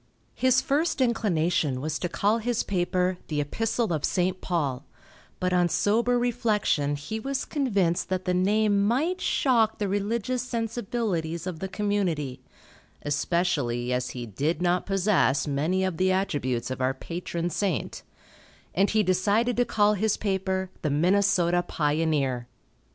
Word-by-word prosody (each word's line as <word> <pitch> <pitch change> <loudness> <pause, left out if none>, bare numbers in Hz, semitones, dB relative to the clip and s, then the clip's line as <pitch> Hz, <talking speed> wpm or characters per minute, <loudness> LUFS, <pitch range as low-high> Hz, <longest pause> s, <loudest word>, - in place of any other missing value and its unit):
His 255 0 +3
first 295 +5 0
inclination 175 - +1
was 155 +3 -3
to 175 - -2
call 210 +6 +1
his 235 0 -1
paper 180 -1 0
the 150 -2 -2
"Epistle 220 +7 -1
of 155 - -2
St. 185 +1 0
Paul," 145 -7 -1 0.6
but 180 0 0
on 175 -1 +3
sober 235 +7 +2
reflection 210 -11 +1
he 145 +10 -5
was 270 +3 -3
convinced 200 - 0
that 185 0 -2
the 180 - +1
name 200 +2 +2
might 305 - +1
shock 230 -5 +2
the 205 - -1
religious 220 +5 -1
sensibilities 225 -8 -2
of 180 -4 -5
the 190 - -3
community, 190 -9 -1 0.6
especially 145 -6 0
as 125 0 -1
he 120 - -4
did 145 - -2
not 180 0 +1
possess 190 - +2
many 155 +6 0
of 185 -3 -1
the 185 +2 +2
attributes 140 -11 -1
of 130 - -4
our 130 +1 +1
patron 170 +3 -4
saint, 175 - -2 0.7
and 195 +3 +2
he 215 -1 +2
decided 205 +6 +2
to 245 - +3
call 210 -2 +3
his 210 +1 0
paper 190 -2 -1
"The 155 - 0
Minnesota 175 +2 +3
Pioneer." 145 -6 0
185 Hz, 145 wpm, -26 LUFS, 160-215 Hz, 0.7 s, His